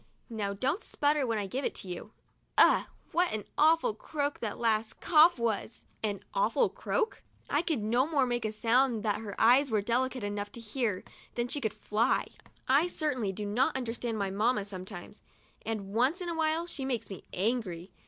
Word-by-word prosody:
Now 205 -3 -2
don't 275 - -1
sputter 290 -2 +1
when 225 -1 0
I 205 - -1
give 255 +8 -3
it - - -2
to - - -9
you. 180 +4 -6 0.5
Ugh! - - +6 0.2
what 350 +1 +2
an 215 -1 -2
awful 320 -5 +4
croak 285 +6 -3
that 220 -3 -3
last 225 -1 0
cough 325 0 +6
was! 230 -1 -2
' - - -38
An 205 -2 -1
awful - - +2
croak? 455 -2 -2 0.3
I 290 - +3
could 315 -10 -1
no 240 +6 +2
more 290 -5 +2
make 240 -1 -1
a 215 - -1
sound 230 +1 +2
that 210 -1 0
her 205 -3 -6
ears 255 +5 +5
were 220 -2 +2
delicate 250 +3 0
enough 205 0 -3
to - - -8
hear 225 -3 -2 0.3
than 240 0 0
she 290 - -1
could 220 -4 0
fly. 220 +4 +1 0.4
I 280 +6 +4
certainly 270 - -1
do 205 +2 -5
not 240 +6 +1
understand 235 -2 -3
my 200 -2 -1
mamma 210 +1 +1
sometimes, 185 -2 -8 0.5
and 205 -3 -3
once 255 - +2
in 355 -1 -4
a 335 - -2
while 320 +1 +1
she 300 -5 -5
makes 245 -5 -2
me 195 - -7
angry. 190 -4 -2
235 Hz, 195 wpm, -30 LUFS, 210-280 Hz, 0.5 s, Ugh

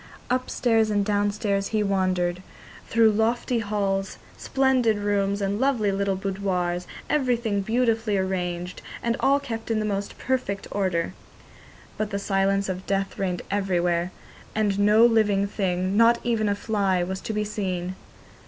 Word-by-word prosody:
Upstairs 240 -3 +1
and 205 -1 +1
downstairs 205 -1 0
he 215 -1 0
wandered, 185 -2 0 0.5
through 225 -1 +4
lofty 230 +3 +1
halls, 200 -2 -1 0.2
splendid 260 -5 +2
rooms, 200 -1 0
and 200 +1 -1
lovely 245 -6 +2
little 195 0 0
boudoirs, 185 -2 -2 0.2
everything 240 -7 +1
beautifully 225 -1 +1
arranged, 180 -2 -2 0.2
and 235 0 +1
all 275 +1 +3
kept 230 -6 -6
in 225 - +1
the 215 - 0
most 200 -1 -3
perfect 250 -7 -2
order. 185 -4 -1 0.9
But 215 -1 -1
the 200 - -2
silence 195 0 +1
of 185 0 -5
death 195 0 -1
reigned 180 -3 -1
everywhere, 180 -3 0 0.4
and 205 -2 +1
no 210 +3 +6
living 210 -4 +3
thing, 185 -1 -1
not 230 +2 +6
even 225 -3 +1
a 200 - +1
fly, 200 -4 0
was 190 +1 -4
to - - -4
be 210 -1 -1
seen. 185 -4 -3
200 Hz, 145 wpm, -25 LUFS, 190-220 Hz, 0.9 s, no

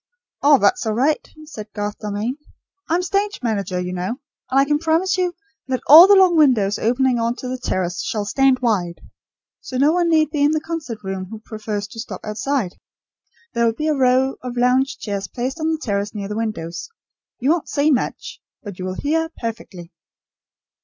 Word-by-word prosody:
"Oh, 290 0 +6
that's 370 -4 +2
all 215 - 0
right," 285 +6 +1 0.2
said 225 -9 -9
Garth 205 0 -4
Dalmain, 215 +5 -3 0.5
"I'm 345 +3 +1
stage 400 +2 -1
manager, 200 -5 -1
you 180 0 -4
know; 185 +6 -3 0.3
and 270 +1 +3
I 275 - +4
can 295 +1 +1
promise 330 +4 +1
you 360 -2 -1 0.3
that 260 -1 -2
all 325 +6 +10
the 405 - +7
long 375 -3 +5
windows 240 -10 +3
opening 250 +2 +1
on 230 +1 0
to 255 - -7
the 255 0 -4
terrace 180 -6 -2
shall 210 -2 -2
stand 265 +3 +2
wide. 180 -7 0 0.6
So 255 - -6
no 285 +4 +4
one 345 0 +1
need 310 -2 +3
be 295 -2 -1
in 290 +2 +4
the 310 - +1
concert 310 -9 -6
room, 190 -1 -4
who 220 - -7
prefers 215 -2 -5
to 225 - -10
stop 225 - -6
outside. 215 -1 -2 0.7
There 235 - +1
will 225 - +1
be 310 +3 -1
a - - +3
row 260 0 +2
of 250 -1 -6
lounge 260 +2 +2
chairs 200 -6 -4
placed 255 - -4
on 315 0 0
the 320 - 0
terrace 205 -5 -2
near 200 -1 -4
the 210 - -4
windows. 215 - -4 0.5
You 270 +4 +1
won't 335 -2 -1
see 295 +1 +2
much; 255 - -2 0.2
but 200 -5 -9
you 185 - -4
will 185 0 -4
hear, 325 +6 -1
perfectly." 195 -7 -7
250 Hz, 195 wpm, -20 LUFS, 210-300 Hz, 0.7 s, all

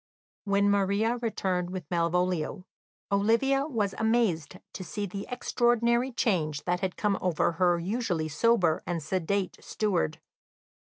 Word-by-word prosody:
When 200 0 +2
Maria 200 +4 +2
returned 185 -6 -1
with 185 -3 -5
Malvolio, 180 +1 0 0.5
Olivia 230 +8 +2
was 210 -9 -1
amazed 220 -8 +1 0.2
to 185 - -6
see 205 +2 -4
the 200 +1 -6
extraordinary 240 0 +1
change 160 - 0
that 180 0 0
had 190 -1 -3
come 205 -2 0
over 175 -2 +1
her 175 +1 +2
usually 180 -3 -1
sober 170 0 +2
and 170 -3 -2
sedate 185 +4 -1
steward. 180 -7 -1
195 Hz, 125 wpm, -28 LUFS, 175-225 Hz, 0.5 s, When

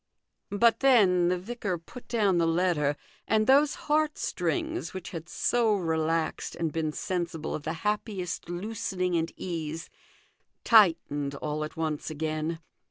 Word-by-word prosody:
But 225 +3 +3
then 195 -10 +5
the 180 +1 +2
vicar 200 -1 -3
put 170 +9 -13
down 205 -7 +2
the 165 - +3
letter, 165 -4 +2 0.3
and 215 0 +3
those 280 +5 +5
heartstrings, 310 - -1
which 185 -2 -6
had 165 0 -7
so 230 -3 +2
relaxed 165 -2 -1
and 165 -3 -2
been 160 -2 -1
sensible 170 -1 -3
of - - -3
the 160 +2 -3
happiest 205 -5 -2
loosening 180 -1 -2
and 165 0 0
ease, 165 -2 -5 0.7
tightened 165 -10 +4
all 150 +1 -3
at 155 +2 -7
once 155 -2 -2
again. 155 +1 -3
175 Hz, 135 wpm, -28 LUFS, 160-215 Hz, 0.7 s, then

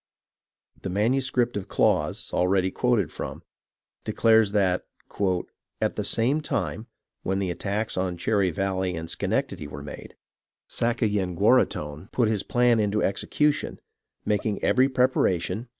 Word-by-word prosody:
The - - -4
manuscript 120 +4 +1
of 100 -2 -4
Claus, - - 0
already 95 +1 +2
quoted 120 - +1
from, - - -6 0.6
declares 110 -2 +3
that 95 -3 +1 0.5
" 90 - -9
At - - 0
the - - -2
same 135 +7 +2
time 115 -6 -2 0.3
[when 95 +1 -1
the 95 -2 -1
attacks 105 +5 -3
on 90 -1 -1
Cherry 100 +1 +1
Valley 95 +1 -1
and 80 0 -5
Schenectady 95 - -2
were 70 0 -8
made] 75 - -9 0.5
Sakayenguaraghton 95 - +1
put 120 -4 +2
his 105 -3 0
plan 120 0 +2
into 105 0 +1
Excution, 145 +9 0 0.5
making 105 0 -1
every 130 +1 +4
preparation. 120 -5 +1
100 Hz, 125 wpm, -25 LUFS, 90-115 Hz, 0.6 s, every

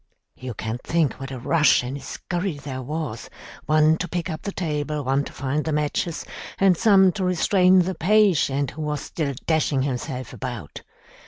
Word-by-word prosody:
You 125 -3 -7
can 110 +4 -4
think 165 -4 0
what 135 0 -6
a 135 - -6
rush 145 +2 +3
and 125 +2 -4
a - - -6
scurry 175 +2 -4
there 135 -2 -6
was, 150 -3 -5 0.4
one 155 +1 +4
to 180 - -3
pick 175 0 -3
up 155 - -5
the 200 - -4
table, 150 -4 -2
one 135 +2 +1
to - - -8
find 140 +2 -2
the 160 - -2
matches, 150 +3 -1 0.3
and 195 -2 +4
some 190 -1 +5
to 190 +1 -4
restrain 185 +1 +4
the 190 +2 -2
patient 170 - +2
who 155 - -8
was 150 -2 -2
still 145 -5 -3
dashing 155 -4 +1
himself 130 -2 -4
about. 120 - -6
150 Hz, 180 wpm, -23 LUFS, 135-175 Hz, 0.4 s, some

